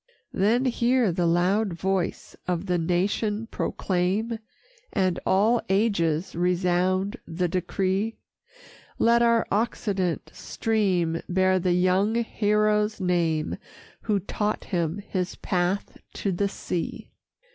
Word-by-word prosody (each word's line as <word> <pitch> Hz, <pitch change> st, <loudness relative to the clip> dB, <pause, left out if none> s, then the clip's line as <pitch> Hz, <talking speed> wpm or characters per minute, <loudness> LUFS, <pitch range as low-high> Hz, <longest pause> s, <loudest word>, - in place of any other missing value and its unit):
Then 225 Hz, +7 st, +2 dB
hear 245 Hz, -3 st, +2 dB
the 175 Hz, 0 st, 0 dB
loud 185 Hz, +4 st, +2 dB
voice 190 Hz, +1 st, -2 dB
of 180 Hz, 0 st, -1 dB
the 180 Hz, -2 st, 0 dB
nation 205 Hz, +6 st, 0 dB
proclaim, 195 Hz, +5 st, -1 dB, 0.5 s
And 185 Hz, -4 st, +1 dB
all 220 Hz, +5 st, +3 dB
ages 190 Hz, -5 st, +1 dB
resound 180 Hz, +2 st, +1 dB
the 180 Hz, +2 st, -1 dB
decree: 190 Hz, +4 st, -1 dB, 0.8 s
Let 235 Hz, +1 st, +4 dB
our 235 Hz, -1 st, +4 dB
occident 200 Hz, -5 st, -1 dB
stream 185 Hz, -7 st, 0 dB
bear 185 Hz, +1 st, +3 dB
the 180 Hz, 0 st, +1 dB
young 185 Hz, +4 st, +2 dB
hero's 210 Hz, -2 st, +1 dB
name, 170 Hz, -4 st, 0 dB, 0.4 s
Who 210 Hz, -2 st, +1 dB
taught 210 Hz, +3 st, -2 dB
him 170 Hz, -2 st, -1 dB
his 185 Hz, -1 st, -2 dB
path 180 Hz, +2 st, -1 dB, 0.2 s
to 200 Hz, -, -1 dB
the 200 Hz, +3 st, 0 dB
sea. 180 Hz, -3 st, -4 dB
190 Hz, 110 wpm, -26 LUFS, 180-210 Hz, 0.8 s, Let